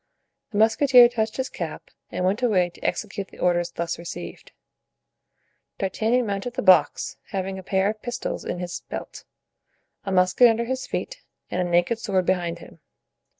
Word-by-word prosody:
The 205 Hz, -, -5 dB
musketeer 240 Hz, +3 st, +6 dB
touched 220 Hz, -2 st, -2 dB
his 260 Hz, 0 st, -1 dB
cap -, -, -7 dB, 0.2 s
and 180 Hz, -, -2 dB
went 195 Hz, +5 st, +1 dB
away 185 Hz, -8 st, +2 dB
to -, -, -18 dB
execute 200 Hz, -2 st, -2 dB
the -, -, -17 dB
orders 175 Hz, -1 st, +1 dB
thus 170 Hz, 0 st, -4 dB
received. 170 Hz, -, -8 dB, 1.3 s
D'Artagnan 225 Hz, +5 st, 0 dB
mounted 205 Hz, +4 st, -3 dB
the 255 Hz, -, -2 dB
box, 175 Hz, -6 st, +4 dB
having 190 Hz, 0 st, -3 dB
a -, -, -7 dB
pair 190 Hz, +1 st, +1 dB
of 215 Hz, 0 st, -12 dB
pistols 245 Hz, 0 st, -4 dB
in -, -, -4 dB
his 175 Hz, 0 st, -5 dB
belt, -, -, -7 dB, 0.8 s
a 195 Hz, -, -4 dB
musket 185 Hz, +6 st, +5 dB
under 230 Hz, 0 st, +1 dB
his 260 Hz, +2 st, -3 dB
feet -, -, -4 dB, 0.3 s
and 180 Hz, -, 0 dB
a 180 Hz, -, -1 dB
naked 175 Hz, +7 st, +2 dB
sword 190 Hz, -5 st, 0 dB
behind 175 Hz, -2 st, 0 dB
him. 170 Hz, -, -14 dB
195 Hz, 165 wpm, -24 LUFS, 180-235 Hz, 1.3 s, musketeer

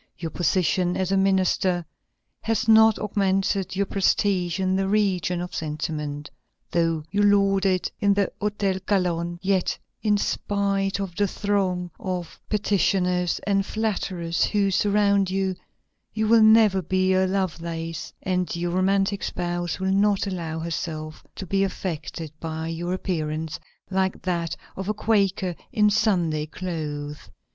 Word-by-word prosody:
Your 165 Hz, -2 st, -5 dB
position 180 Hz, 0 st, +1 dB
as 190 Hz, 0 st, -1 dB
a -, -, +3 dB
minister 190 Hz, -2 st, +2 dB, 0.6 s
has 225 Hz, -1 st, -1 dB
not 220 Hz, -1 st, +7 dB
augmented 195 Hz, -2 st, 0 dB
your 200 Hz, +1 st, +1 dB
prestige 190 Hz, -2 st, +1 dB
in 185 Hz, 0 st, +1 dB
the 190 Hz, 0 st, 0 dB
region 190 Hz, -4 st, +1 dB
of 180 Hz, -, -6 dB
sentiment. 150 Hz, -1 st, -4 dB, 0.4 s
Though 165 Hz, -2 st, +1 dB
you 205 Hz, -, +1 dB
lord 200 Hz, -1 st, +4 dB
it 185 Hz, -1 st, 0 dB
in 200 Hz, -1 st, +3 dB
the 200 Hz, -2 st, +1 dB
Hotel 205 Hz, -2 st, 0 dB
Calonne, 175 Hz, -3 st, 0 dB
yet, 190 Hz, -2 st, +1 dB, 0.2 s
in 210 Hz, -2 st, +2 dB
spite 200 Hz, -1 st, 0 dB
of 190 Hz, -3 st, -4 dB
the 205 Hz, +2 st, +2 dB
throng 185 Hz, -3 st, -1 dB
of 180 Hz, -3 st, -4 dB
petitioners 185 Hz, -4 st, +1 dB
and 195 Hz, -1 st, +2 dB
flatterers 190 Hz, -6 st, -1 dB
who 200 Hz, -2 st, +1 dB
surround 200 Hz, 0 st, +3 dB
you, 190 Hz, 0 st, 0 dB, 0.6 s
you 220 Hz, 0 st, +1 dB
will 230 Hz, +1 st, +6 dB
never 220 Hz, -3 st, +6 dB
be 185 Hz, +2 st, +1 dB
a 190 Hz, 0 st, +3 dB
Lovelace, 165 Hz, -4 st, -3 dB
and 180 Hz, -1 st, -1 dB
your 175 Hz, 0 st, -2 dB
romantic 195 Hz, +2 st, +1 dB
spouse 175 Hz, 0 st, -3 dB
will 190 Hz, 0 st, 0 dB
not 200 Hz, 0 st, +2 dB
allow 170 Hz, -5 st, -4 dB
herself 155 Hz, -1 st, -4 dB
to 195 Hz, -, -6 dB
be 195 Hz, +2 st, +1 dB
affected 165 Hz, -4 st, -4 dB
by 160 Hz, 0 st, -4 dB
your 175 Hz, +2 st, -3 dB
appearance, 160 Hz, -4 st, -3 dB, 0.3 s
like 190 Hz, -1 st, 0 dB
that 170 Hz, -3 st, -1 dB, 0.2 s
of 190 Hz, +1 st, -4 dB
a 215 Hz, -, 0 dB
Quaker 195 Hz, -4 st, +1 dB, 0.2 s
in 210 Hz, -4 st, +3 dB
Sunday 175 Hz, -8 st, +1 dB
clothes. 150 Hz, -4 st, -5 dB
185 Hz, 140 wpm, -24 LUFS, 170-200 Hz, 0.6 s, not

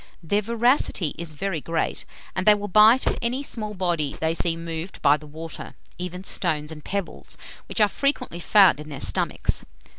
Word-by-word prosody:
Their 200 Hz, +6 st, +1 dB
voracity 230 Hz, -, +1 dB
is 165 Hz, -2 st, -5 dB
very 170 Hz, 0 st, -3 dB
great, 165 Hz, +1 st, -1 dB, 0.3 s
and 185 Hz, +1 st, -2 dB
they 210 Hz, -, +9 dB
will 205 Hz, 0 st, -5 dB
bite 215 Hz, +6 st, +6 dB
at -, -, 0 dB
any 250 Hz, +4 st, -1 dB
small 215 Hz, -6 st, -2 dB
body 170 Hz, -6 st, -1 dB
they 160 Hz, 0 st, +1 dB
see 165 Hz, 0 st, 0 dB
moved 165 Hz, +2 st, -6 dB
by 145 Hz, -, +6 dB
the 150 Hz, 0 st, -10 dB
water, 160 Hz, +2 st, -8 dB, 0.2 s
even 180 Hz, +1 st, -5 dB
stones 155 Hz, -5 st, -1 dB
and 150 Hz, -2 st, -10 dB
pebbles, 200 Hz, -2 st, -5 dB, 0.3 s
which -, -, -3 dB
are 210 Hz, -, +6 dB
frequently 275 Hz, -, -1 dB
found 185 Hz, -5 st, +5 dB
in 150 Hz, 0 st, -9 dB
their 140 Hz, -3 st, -7 dB
stomachs. 100 Hz, -2 st, 0 dB
180 Hz, 180 wpm, -24 LUFS, 160-210 Hz, 0.3 s, they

